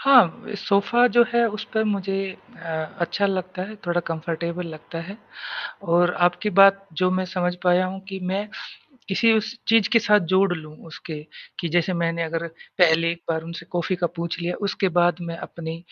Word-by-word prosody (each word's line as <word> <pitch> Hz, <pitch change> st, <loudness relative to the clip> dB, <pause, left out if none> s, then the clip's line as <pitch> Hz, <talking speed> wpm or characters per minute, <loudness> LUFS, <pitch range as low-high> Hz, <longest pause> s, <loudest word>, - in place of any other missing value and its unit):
हाँ 250 Hz, -11 st, +5 dB
अ, -, -, -5 dB
सोफ़ा 210 Hz, +4 st, +3 dB
जो 240 Hz, -, +8 dB
है, 235 Hz, 0 st, +4 dB
उसपे 220 Hz, +1 st, -2 dB
मुझे 195 Hz, -2 st, -1 dB, 0.4 s
अ, 160 Hz, -2 st, -5 dB
अच्छा 200 Hz, +4 st, +1 dB
लगता 185 Hz, -1 st, -3 dB
है 215 Hz, -, -9 dB
थोड़ा 175 Hz, 0 st, +1 dB
कम्फर्टेबल 170 Hz, +2 st, -3 dB
लगता 160 Hz, +1 st, -8 dB
है 190 Hz, +5 st, -8 dB, 0.7 s
और 175 Hz, +1 st, +3 dB
आपकी 180 Hz, +4 st, -3 dB
बात 195 Hz, 0 st, +6 dB, 0.2 s
जो 185 Hz, -, +4 dB
मैं 185 Hz, 0 st, 0 dB
समझ 180 Hz, -1 st, -1 dB
पाया 180 Hz, 0 st, +4 dB
हूँ 190 Hz, +1 st, -5 dB
कि 195 Hz, -1 st, -5 dB
मैं 195 Hz, +3 st, -2 dB, 0.6 s
किसी 225 Hz, +4 st, +4 dB
उस 220 Hz, +1 st, -2 dB
चीज़ 225 Hz, -2 st, +5 dB
के 230 Hz, -, +7 dB
साथ 210 Hz, -2 st, +4 dB
जोड़ 195 Hz, -1 st, +4 dB
लूँ 155 Hz, -1 st, -11 dB
उसके, 160 Hz, -1 st, -8 dB, 0.4 s
कि 170 Hz, -, -2 dB
जैसे 175 Hz, +2 st, +1 dB
मैंने 170 Hz, -1 st, 0 dB
अगर 165 Hz, +1 st, -3 dB, 0.3 s
पहले 165 Hz, -1 st, +5 dB
एक 170 Hz, 0 st, -10 dB
बार 160 Hz, -1 st, -1 dB
उनसे 165 Hz, 0 st, -8 dB
कॉ 175 Hz, -, 0 dB
फ़ी 185 Hz, -, 0 dB
का 175 Hz, 0 st, 0 dB
पूछ 170 Hz, 0 st, -3 dB
लिया, 175 Hz, +1 st, -2 dB
उसके 195 Hz, -1 st, 0 dB
बाद 175 Hz, -1 st, +3 dB
मैं 170 Hz, -1 st, -5 dB
अपनी 165 Hz, -1 st, -7 dB
180 Hz, 190 wpm, -23 LUFS, 170-195 Hz, 0.7 s, जो